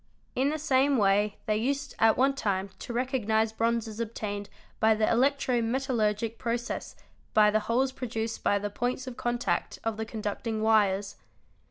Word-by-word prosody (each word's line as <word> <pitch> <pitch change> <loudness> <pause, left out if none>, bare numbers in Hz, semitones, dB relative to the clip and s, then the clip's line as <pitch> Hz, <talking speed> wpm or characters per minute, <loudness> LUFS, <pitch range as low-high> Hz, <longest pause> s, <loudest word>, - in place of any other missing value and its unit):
In 265 +3 +1
the 310 - -1
same 280 -2 +3
way 205 0 +2
they 215 -1 +1
used 275 +4 -1
at 225 0 +5
one 270 +2 +4
time 195 -6 -2
to - - -6
recognise 230 -3 +1
bronzes 225 -1 -1
obtained 205 -3 -4 0.3
by 220 0 +4
the 215 0 +1
electro 255 0 +2
metallurgic 230 -3 0
process 240 0 -3 0.4
by 210 -1 +6
the 215 - +3
holes 260 +3 +2
produced 225 -3 -4
by 205 - +3
the 205 0 -3
_ - - -27
points 250 +3 -2
of 255 -2 -7
contact 240 0 -1
of 225 -1 -2
the 220 - -3
conducting 220 0 -3
wires. 205 -3 +2
225 Hz, 165 wpm, -28 LUFS, 215-255 Hz, 0.4 s, by